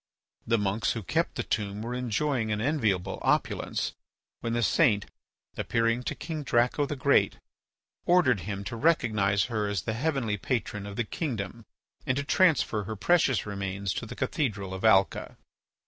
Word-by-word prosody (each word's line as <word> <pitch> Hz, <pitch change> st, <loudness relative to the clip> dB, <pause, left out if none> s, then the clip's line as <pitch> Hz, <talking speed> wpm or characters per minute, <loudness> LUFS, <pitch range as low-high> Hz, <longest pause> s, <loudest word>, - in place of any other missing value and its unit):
The 115 Hz, 0 st, +3 dB
monks 105 Hz, +1 st, 0 dB
who 115 Hz, -, -5 dB
kept -, -, 0 dB
the -, -, -2 dB
tomb 105 Hz, -1 st, -2 dB
were 120 Hz, +2 st, -4 dB
enjoying 125 Hz, -1 st, -1 dB
an 105 Hz, -, 0 dB
enviable 110 Hz, -, 0 dB
opulence, -, -, 0 dB, 0.5 s
when 115 Hz, -, -3 dB
the 120 Hz, 0 st, +1 dB
saint, 105 Hz, -, +3 dB, 0.5 s
appearing 115 Hz, +1 st, +1 dB
to -, -, -2 dB
King 160 Hz, -2 st, -5 dB
Draco 125 Hz, +2 st, +2 dB
the 145 Hz, -, -3 dB
Great, 130 Hz, -, +3 dB, 0.7 s
ordered 170 Hz, -, +4 dB
him 100 Hz, +1 st, -5 dB
to 115 Hz, -, -5 dB
recognise 110 Hz, -, +2 dB
her 110 Hz, -2 st, -1 dB
as 100 Hz, -4 st, -2 dB
the 110 Hz, -, -2 dB
heavenly 120 Hz, -4 st, -1 dB
patron 105 Hz, -2 st, -2 dB
of 100 Hz, -, -7 dB
the 120 Hz, -, 0 dB
kingdom 115 Hz, -, -4 dB, 0.4 s
and 130 Hz, -, 0 dB
to 145 Hz, -, 0 dB
transfer 140 Hz, -, +2 dB
her 110 Hz, +2 st, -4 dB
precious 145 Hz, -, +2 dB
remains 100 Hz, -1 st, -3 dB
to 115 Hz, -, -4 dB
the 125 Hz, -, -8 dB
cathedral 100 Hz, -10 st, -2 dB
of 95 Hz, -, -6 dB
Alca. 95 Hz, -4 st, +3 dB
115 Hz, 165 wpm, -28 LUFS, 100-130 Hz, 0.7 s, ordered